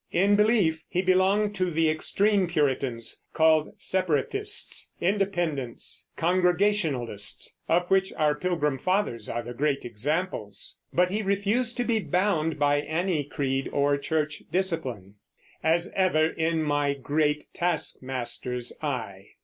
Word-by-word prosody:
In 200 Hz, +3 st, +4 dB
belief, 205 Hz, -7 st, +3 dB
he 180 Hz, -, 0 dB
belonged 195 Hz, +3 st, +3 dB
to 185 Hz, -1 st, +1 dB
the 165 Hz, -1 st, +2 dB
extreme 195 Hz, +5 st, +2 dB
Puritans, 135 Hz, -7 st, -1 dB
called 160 Hz, -1 st, +4 dB
Separatists, 190 Hz, -, -1 dB
Independents, 175 Hz, -, -1 dB
Congregationalists, 175 Hz, -, 0 dB
of 175 Hz, +2 st, +3 dB
which 190 Hz, 0 st, +3 dB
our 150 Hz, -1 st, +2 dB
Pilgrim 150 Hz, -4 st, -1 dB
Fathers 185 Hz, -, 0 dB
are 120 Hz, 0 st, -2 dB
the 120 Hz, +1 st, -7 dB
great 140 Hz, +1 st, 0 dB
examples; 120 Hz, -, -3 dB
but 180 Hz, +1 st, +2 dB
he 210 Hz, +2 st, 0 dB
refused 205 Hz, +5 st, 0 dB
to 245 Hz, -, +1 dB
be 230 Hz, -2 st, +1 dB
bound 180 Hz, -6 st, 0 dB
by 145 Hz, 0 st, +3 dB
any 160 Hz, +2 st, -1 dB
creed 135 Hz, -2 st, -2 dB
or 145 Hz, 0 st, +2 dB
church 150 Hz, +1 st, -2 dB
discipline: 135 Hz, -, -2 dB, 0.5 s
As 170 Hz, +2 st, +1 dB
ever 165 Hz, -5 st, +3 dB
in 160 Hz, 0 st, 0 dB
my 145 Hz, -1 st, +1 dB
great 150 Hz, +2 st, -1 dB
Task 170 Hz, -3 st, -1 dB
Master's 125 Hz, -1 st, -3 dB
eye. 115 Hz, -10 st, -4 dB
160 Hz, 125 wpm, -27 LUFS, 140-185 Hz, 0.5 s, In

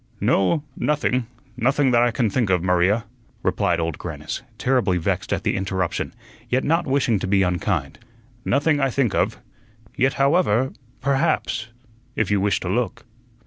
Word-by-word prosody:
"No, 120 Hz, -, +2 dB
nothing 130 Hz, -5 st, 0 dB, 0.3 s
nothing 130 Hz, +2 st, +2 dB
that 120 Hz, -1 st, +4 dB
I 120 Hz, -, +4 dB
can 120 Hz, 0 st, 0 dB
think 110 Hz, +1 st, 0 dB
of, 90 Hz, -2 st, +2 dB
Maria," 90 Hz, +5 st, +2 dB, 0.4 s
replied 85 Hz, -1 st, +1 dB
Old 80 Hz, -2 st, -2 dB
Grannis, 75 Hz, -3 st, -5 dB, 0.2 s
terribly 125 Hz, -8 st, +2 dB
vexed 80 Hz, -, -2 dB
at -, -, -1 dB
the -, -, 0 dB
interruption, 95 Hz, -2 st, -2 dB, 0.4 s
yet 130 Hz, +1 st, +1 dB
not 165 Hz, +2 st, +1 dB
wishing 130 Hz, -6 st, +2 dB
to 95 Hz, -, -3 dB
be 95 Hz, 0 st, +3 dB
unkind. 90 Hz, -2 st, -1 dB, 0.4 s
"Nothing 145 Hz, +3 st, +2 dB
I 135 Hz, -1 st, +2 dB
think 125 Hz, -3 st, 0 dB
of. -, -, +1 dB, 0.6 s
Yet, 135 Hz, +1 st, +2 dB
however 135 Hz, -, +2 dB, 0.3 s
perhaps 140 Hz, -5 st, 0 dB, 0.5 s
if 110 Hz, -3 st, 0 dB
you 100 Hz, -1 st, +2 dB
wish 100 Hz, 0 st, +1 dB
to -, -, -4 dB
look." 120 Hz, +6 st, -2 dB
115 Hz, 155 wpm, -22 LUFS, 95-135 Hz, 0.6 s, that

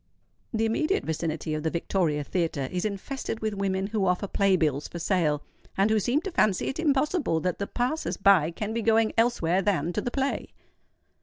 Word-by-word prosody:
The 225 Hz, -1 st, 0 dB
immediate 310 Hz, -, +1 dB
vicinity 160 Hz, -1 st, -2 dB
of 155 Hz, -, -2 dB
the 160 Hz, -, 0 dB
Victoria 165 Hz, -3 st, 0 dB
Theatre 160 Hz, -4 st, -1 dB
is 180 Hz, +1 st, -2 dB
infested 220 Hz, +4 st, -4 dB
with 215 Hz, -1 st, -2 dB
women 195 Hz, -1 st, -1 dB
who 205 Hz, -2 st, 0 dB
offer 180 Hz, +2 st, +1 dB
play 195 Hz, 0 st, +2 dB
bills 150 Hz, -5 st, 0 dB
for -, -, -8 dB
sale, 160 Hz, -4 st, +1 dB, 0.3 s
and 200 Hz, +3 st, +3 dB
who 220 Hz, -, +4 dB
seem 245 Hz, +9 st, +1 dB
to 390 Hz, -, -5 dB
fancy 210 Hz, -, +2 dB
it 270 Hz, -, -5 dB
impossible 295 Hz, -, +1 dB
that 180 Hz, 0 st, -2 dB
the 200 Hz, -, -2 dB
passers 255 Hz, +6 st, -2 dB
by 195 Hz, -6 st, +5 dB
can 210 Hz, +5 st, -4 dB
be 230 Hz, -, -1 dB
going 225 Hz, 0 st, +3 dB
elsewhere 195 Hz, -6 st, +2 dB
than 175 Hz, -4 st, 0 dB
to 210 Hz, -, -1 dB
the 245 Hz, -, -2 dB
play. 270 Hz, +2 st, -2 dB
195 Hz, 190 wpm, -27 LUFS, 170-225 Hz, 0.3 s, by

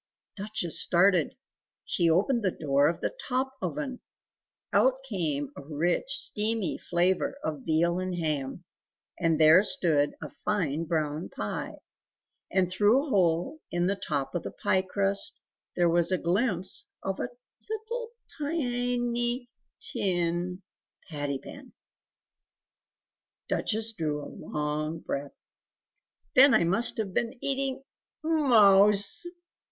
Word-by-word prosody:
Duchess 200 Hz, -5 st, 0 dB
started! 180 Hz, -2 st, +3 dB, 0.5 s
She 170 Hz, -2 st, +2 dB
opened 205 Hz, +9 st, +2 dB
the 195 Hz, -, +1 dB
door 145 Hz, -4 st, +1 dB
of 165 Hz, +1 st, -2 dB
the -, -, -2 dB
TOP 265 Hz, 0 st, -1 dB
oven; 275 Hz, -4 st, -4 dB, 0.7 s
out 265 Hz, +1 st, +3 dB
came 150 Hz, -, -2 dB
a -, -, -8 dB
rich 155 Hz, -, -1 dB
steamy 220 Hz, -, 0 dB
flavour 180 Hz, +9 st, 0 dB
of 150 Hz, -4 st, -4 dB
veal 170 Hz, +3 st, +1 dB
and 185 Hz, -1 st, -3 dB
ham, 155 Hz, -2 st, -2 dB, 0.6 s
and 165 Hz, -3 st, +1 dB
there 160 Hz, +3 st, +7 dB
stood 155 Hz, -7 st, +2 dB
a -, -, -8 dB
fine 165 Hz, -7 st, -1 dB
brown 155 Hz, -1 st, -2 dB
pie, -, -, -5 dB, 0.7 s
and 190 Hz, -1 st, +2 dB
through 210 Hz, -, +3 dB
a -, -, -7 dB
hole 185 Hz, -, +1 dB
in 175 Hz, 0 st, 0 dB
the 195 Hz, +2 st, +1 dB
top 140 Hz, -7 st, -3 dB
of 175 Hz, -, -1 dB
the -, -, -5 dB
pie 190 Hz, -, 0 dB
crust 195 Hz, +1 st, 0 dB, 0.4 s
there 175 Hz, -1 st, +3 dB
was 170 Hz, +1 st, +3 dB
a 185 Hz, -, +2 dB
glimpse 185 Hz, +1 st, 0 dB, 0.2 s
of 195 Hz, 0 st, -3 dB
a -, -, -2 dB, 0.4 s
little 450 Hz, +2 st, -4 dB, 0.3 s
tin 245 Hz, -4 st, -1 dB, 1.7 s
patty 145 Hz, -2 st, -2 dB
pan! 270 Hz, -, -12 dB, 1.7 s
Duchess 225 Hz, +1 st, 0 dB
drew 150 Hz, -6 st, -3 dB
a -, -, -10 dB
long 150 Hz, +2 st, -3 dB
breath 140 Hz, 0 st, -5 dB, 1.0 s
"Then 270 Hz, +2 st, +7 dB
I -, -, +4 dB
must 195 Hz, +8 st, +2 dB
have 205 Hz, -4 st, -3 dB
been 240 Hz, +5 st, -1 dB
eating 270 Hz, 0 st, 0 dB, 0.4 s
MOUSE!... 210 Hz, -, +5 dB
190 Hz, 120 wpm, -28 LUFS, 160-240 Hz, 1.7 s, there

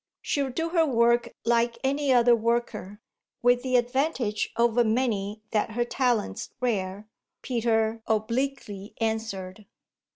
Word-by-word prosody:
"She'll 280 Hz, -2 st, 0 dB
do 325 Hz, +6 st, -2 dB
her 335 Hz, -1 st, +3 dB
work 235 Hz, -4 st, +2 dB
like 235 Hz, 0 st, +2 dB
any 280 Hz, +1 st, +1 dB
other 240 Hz, -1 st, +6 dB
worker, 230 Hz, -3 st, -2 dB, 0.4 s
with 245 Hz, 0 st, +4 dB
the 255 Hz, 0 st, -1 dB
advantage 245 Hz, -3 st, 0 dB
over 235 Hz, 0 st, +3 dB
many 215 Hz, -3 st, -1 dB
that 220 Hz, 0 st, 0 dB
her 240 Hz, +1 st, 0 dB
talent's 240 Hz, -, -1 dB
rare," 205 Hz, -4 st, -2 dB, 0.4 s
Peter 225 Hz, -2 st, 0 dB
obliquely 220 Hz, -2 st, -2 dB
answered. 215 Hz, -3 st, -3 dB
235 Hz, 120 wpm, -26 LUFS, 215-250 Hz, 0.4 s, other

